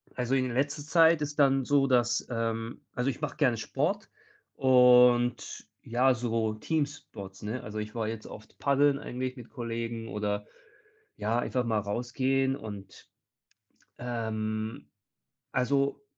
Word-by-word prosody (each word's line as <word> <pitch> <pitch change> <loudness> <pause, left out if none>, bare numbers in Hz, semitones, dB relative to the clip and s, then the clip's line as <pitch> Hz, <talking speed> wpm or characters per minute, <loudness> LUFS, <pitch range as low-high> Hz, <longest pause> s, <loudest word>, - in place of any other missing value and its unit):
Also, 125 +1 0
in 130 -1 +1
letzter 145 +4 -1
Zeit 165 0 +5
ist 150 0 -4
dann 135 -2 +4
so, 140 0 +3
dass 120 -2 +2
ähm, 115 -1 -3
also, 125 +2 0
ich 135 - -5
mache 150 0 -3
gerne 130 -6 +3
Sport 155 - -2 0.5
und 125 -2 +4
ja, 125 +3 +2
so 115 -2 -1
Teamsports, 135 -9 -4
ne? 115 +5 -4
Also, 105 +1 -5
ich 105 +1 -6
war 115 -2 -1
jetzt 110 -1 -5
oft 110 - -12
paddeln 140 0 +3
eigentlich 130 -1 -4
mit 120 - -11
Kollegen 115 -2 -4
oder 105 0 -2 0.7
ja, 110 +3 0
einfach 125 +1 -1
mal 110 -3 +1
rausgehen 130 +5 0
und, 100 -3 -10 0.9
ähm 110 -2 -3 0.7
also, 140 +2 +1
125 Hz, 135 wpm, -29 LUFS, 115-135 Hz, 0.9 s, Zeit